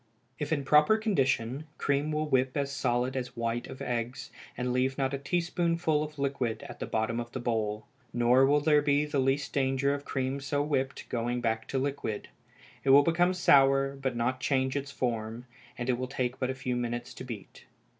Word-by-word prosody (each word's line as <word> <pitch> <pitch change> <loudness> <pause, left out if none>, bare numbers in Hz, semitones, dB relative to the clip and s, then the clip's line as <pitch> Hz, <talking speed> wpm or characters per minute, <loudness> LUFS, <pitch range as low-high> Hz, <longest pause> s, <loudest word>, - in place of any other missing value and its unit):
If 150 - -3
in 145 -3 +1
proper 150 +10 +5
condition, 135 - 0
cream 145 +2 0
will 155 0 -1
whip 130 -1 +1
as 140 -1 -1
solid 125 -1 0
as 125 -2 -4
white 115 +1 -2
of 130 - -8
eggs, 120 0 -3 0.3
and 125 0 -1
leave 130 +1 +1
not 135 0 0
a 140 - -2
teaspoonful 170 0 0
of 150 0 -8
liquid 135 -5 -2
at - - -10
the - - -4
bottom 110 +2 -1
of 120 0 -5
the 130 - -3
bowl; 110 -3 -1 0.3
nor 120 +2 +4
will 145 +1 +3
there 150 -1 +4
be 145 0 +2
the 145 -2 -1
least 135 +2 0
danger 135 0 +1
of 145 0 -4
cream 135 0 -2
so 145 +1 -1
whipped 135 -3 -2
going 120 +1 -1
back 115 -2 -1
to 135 - -2
liquid. 135 -6 -3 0.5
It 135 - 0
will 140 +2 +8
become 175 +3 +2
sour, 135 -4 +4
but 135 -2 -3
not 125 +2 0
change 130 -1 0
its 140 0 -2
form; 115 -3 -3 0.3
and 120 - -4
it 125 -1 +1
will 130 - -2
take 125 -1 -2
but 130 - 0
a 130 - -2
few 130 -1 -2
minutes 120 0 -3
to - - -8
beat. 115 -6 -9
135 Hz, 200 wpm, -29 LUFS, 120-145 Hz, 0.5 s, will